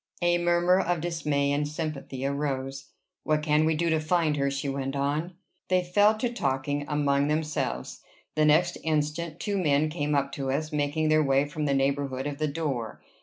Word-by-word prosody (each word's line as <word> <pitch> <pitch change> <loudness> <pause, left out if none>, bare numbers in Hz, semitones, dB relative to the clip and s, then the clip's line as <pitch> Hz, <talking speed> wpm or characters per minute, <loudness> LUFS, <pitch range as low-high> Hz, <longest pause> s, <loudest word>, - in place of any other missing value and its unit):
A 175 0 +3
murmur 175 +1 +3
of 175 -2 0
dismay 150 -4 0
and 145 +1 0
sympathy 150 -4 -4
arose. 135 -1 -2 0.4
"What 155 -1 0
can 150 0 +3
we 160 0 +2
do 170 +1 0
to 160 - +2
find 155 -1 +1
her?" 140 0 +1
she 140 +1 -3
went 135 0 -3
on. 150 +5 -1 0.3
They 185 -1 +2
fell 205 +4 +3
to 240 +2 -2
talking 145 - -1
among 145 -1 +1
themselves. 150 - -2 0.3
The 155 0 +2
next 165 +4 +3
instant, 155 +1 -1
two 200 -2 -1
men 150 -2 +2
came 150 -2 -1
up 140 0 0
to 135 -1 -3
us, 155 +4 -1
making 150 +1 0
their 155 0 +4
way 135 0 +3
from 150 +1 -4
the 140 -1 +1
neighborhood 135 -1 0
of 145 0 -4
the 155 - +1
door. 140 -7 -3
150 Hz, 185 wpm, -27 LUFS, 140-160 Hz, 0.4 s, their